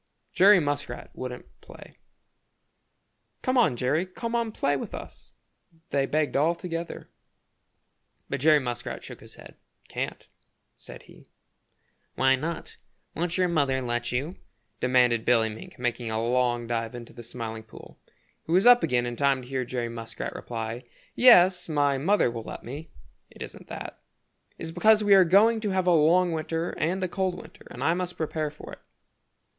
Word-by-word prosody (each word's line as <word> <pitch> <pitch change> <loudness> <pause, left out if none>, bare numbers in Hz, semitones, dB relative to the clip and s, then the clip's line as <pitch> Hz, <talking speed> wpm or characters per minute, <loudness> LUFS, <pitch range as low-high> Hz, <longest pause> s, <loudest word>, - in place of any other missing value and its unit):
Jerry 200 0 +7
Muskrat 145 -5 -4
wouldn't 125 -1 -8
play. - - -15 1.4
"Come 255 -1 0
on, 225 - +4
Jerry, 150 +9 0
come 230 +5 -6
on 235 -2 0
play 145 -8 0
with 135 - -5
us," - - -10 0.6
they 135 -1 +1
begged 155 -1 0
all 160 +5 +3
together. 170 -1 -6 1.2
But - - -3
Jerry 150 -1 +4 0.4
shook - - -10
his - - -13
head. - - -14 0.3
"Can't," - - -5 0.5
said - - -12
he. - - -18 0.9
"Why 130 0 +4
not? 160 +5 -5 0.4
Won't 175 +1 -2
your 180 -1 +3
mother 140 -6 +1
let 120 -1 -2
you?" 140 +9 -3 0.4
demanded 125 -2 +3
Billy 115 -2 +3
Mink, 110 +1 -10
making 120 -1 -2
a 110 0 -1
long 120 0 +1
dive 115 0 -3
into 120 -1 -10
the 120 - -10
Smiling 115 -1 -6
Pool. 110 0 -15 0.4
He - - -8
was 185 +5 +4
up 245 0 +8
again 120 -1 +1
in 120 0 -4
time 135 -1 +1
to - - -12
hear 130 0 -2
Jerry 120 -1 -3
reply: 115 0 -6 0.3
"Yes, 185 -8 +6
my 145 -3 +1
mother 185 - +2
will 115 -1 -5
let - - -9
me. 145 +6 -8 0.4
It - - -9
isn't - - -11
that. - - -8 0.6
It's 165 - -6
because 215 +5 +4
we 205 -1 +5
are 190 -1 +8
going 210 +6 +4
to 215 -1 -2
have 190 -1 0
a 180 - +4
long 170 +3 +4
winter 165 +1 -2
and 185 +4 0
a - - +1
cold 185 -1 -2
winter - - -14
and - - -7
I 165 - +3
must 180 0 -4
prepare 155 -1 -2
for 150 - -12
it." - - -10
145 Hz, 165 wpm, -26 LUFS, 120-180 Hz, 1.4 s, up